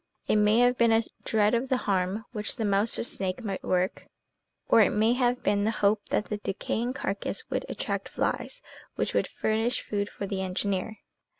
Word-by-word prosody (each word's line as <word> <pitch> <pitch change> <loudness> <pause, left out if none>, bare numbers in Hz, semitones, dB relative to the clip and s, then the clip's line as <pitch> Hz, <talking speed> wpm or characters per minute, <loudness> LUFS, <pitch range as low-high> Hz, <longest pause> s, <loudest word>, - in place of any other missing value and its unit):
It - - +3
may 210 +1 +4
have 245 +1 +4
been 235 -1 +5
a 225 +1 +4 0.2
dread 215 0 +2
of 240 +3 0
the 260 - +2
harm 195 +2 0
which 210 -3 -3
the 225 - -2
mouse 205 +2 +2
or - - -1
snake 195 0 -2
might 195 -3 -4
work, 185 +1 -1 0.6
or 225 - +6
it - - +5
may 220 +3 +3
have 245 0 +1
been 205 0 +2
the 215 - +2
hope 210 -1 +1
that 210 - +1
the 210 - -3
decaying 220 +4 -2
carcass 200 -5 -3
would - - -2
attract - - -3
flies - - -2 0.3
which - - -1
would - - +1
furnish 220 +3 0
food 205 -1 -2
for 200 - -6
the 195 -1 -3
engineer. 190 +2 -2
210 Hz, 195 wpm, -28 LUFS, 200-230 Hz, 0.6 s, or